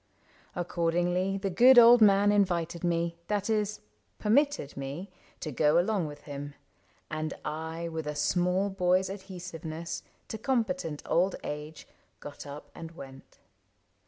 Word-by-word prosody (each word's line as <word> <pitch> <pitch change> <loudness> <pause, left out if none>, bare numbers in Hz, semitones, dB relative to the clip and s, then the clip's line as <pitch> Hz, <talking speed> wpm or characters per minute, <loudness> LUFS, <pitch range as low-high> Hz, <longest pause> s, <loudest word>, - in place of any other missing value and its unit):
Accordingly 175 +2 0
The 195 0 -2
good 245 +7 +7
old 240 0 +9
man 205 -1 +6
invited 175 -4 0
me 170 -1 0
— - - -41
that 205 +1 -1
is, 210 -1 -1 0.4
Permitted 270 - +1
me 140 +8 -6
— - - -31
to 155 - -4
go 150 +4 +3
along 180 -1 +1
with 145 0 -10
him; 145 -1 -7 0.6
And 155 0 -3
I, 160 +2 -4
with 160 -2 -5
a 150 - -3
small 180 +6 +1
boy's 185 0 +1
adhesiveness 175 -4 -6 0.3
To 220 - -5
competent 245 - -1
old 185 +3 +2
age, 150 +1 -7 0.3
got 145 0 -9
up 145 +1 -9
and 165 - -8
went. 135 -4 -12
175 Hz, 140 wpm, -29 LUFS, 155-200 Hz, 0.6 s, old